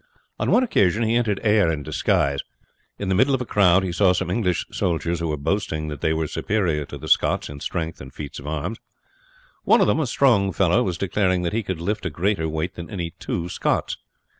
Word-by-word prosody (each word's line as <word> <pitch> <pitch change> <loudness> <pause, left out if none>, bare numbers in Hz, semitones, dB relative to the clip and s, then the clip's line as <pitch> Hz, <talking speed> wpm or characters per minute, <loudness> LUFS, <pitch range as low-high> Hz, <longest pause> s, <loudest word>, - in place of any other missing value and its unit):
On - - 0
one 255 - +4
occasion 105 - +2
he 110 0 +1
entered 110 -5 +1
Ayr 105 -5 +4
in 75 -3 -3
disguise; 70 +1 +1 0.6
in 100 - -4
the 95 - +1
middle 130 +8 +3
of 130 - -3
a - - -3
crowd 95 -3 +4
he 95 - -2
saw 90 +1 +3
some 90 - -2
English 90 -4 0
soldiers, 85 -1 -1
who 85 - -2
were 75 -1 -1
boasting 80 -1 -2
that 75 -3 -7
they 80 - +1
were 80 0 0
superior 85 -3 -1
to - - -8
the - - -9
Scots - - +2
in 70 0 -8
strength 80 +2 -4
and 65 0 -10
feats 70 0 -7
of 70 - -10
arms. 80 +9 -3 0.8
One - - +5
of - - +5
them, - - +2
a 155 - 0
strong 115 -7 +3
fellow, 95 +4 +3
was 90 -6 -1
declaring 95 -1 0
that 85 - -2
he 115 - +1
could 95 -5 -4
lift 95 +2 -2
a - - -2
greater 90 -3 -1
weight 80 +3 -3
than 85 -1 -8
any 85 -5 -4
two 85 0 -3
Scots. - - -1
90 Hz, 225 wpm, -23 LUFS, 80-105 Hz, 0.8 s, One